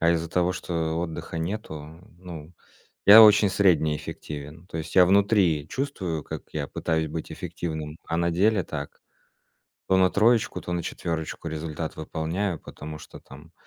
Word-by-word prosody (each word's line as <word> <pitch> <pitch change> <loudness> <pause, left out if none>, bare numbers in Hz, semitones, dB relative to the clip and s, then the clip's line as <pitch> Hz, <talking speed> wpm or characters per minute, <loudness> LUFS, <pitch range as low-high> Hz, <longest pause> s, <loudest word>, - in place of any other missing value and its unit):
А 85 0 +4
из-за 85 -1 0
того, 90 0 +1
что 80 -3 -2
отдыха 85 -1 -5
нету, 80 -4 -6 0.2
ну, 85 -2 -10 0.5
я 110 +3 +11
очень 105 -1 +7
средне 80 -6 +3
эффективен. 75 +4 -8
То 80 - -5
есть 80 +1 -6
я 90 - +9
внутри 95 -6 +3
чувствую, 95 - -3
как - - -7
я - - -3
пытаюсь 80 -1 -1
быть 80 +1 -6
эффективным, 80 -2 -5
а 80 - -2
на 85 0 +1
деле 100 +3 +2
так: 70 -1 -7 0.9
то 95 - +4
на 95 -1 +4
троечку, 115 +2 +2
то 90 - -5
на 85 -1 -1
четвёрочку 80 0 -4
результат 80 0 -5
выполняю. 80 +4 -3
Потому 75 +1 -9
что - - -12
там 75 +5 -15
85 Hz, 160 wpm, -25 LUFS, 80-95 Hz, 0.9 s, я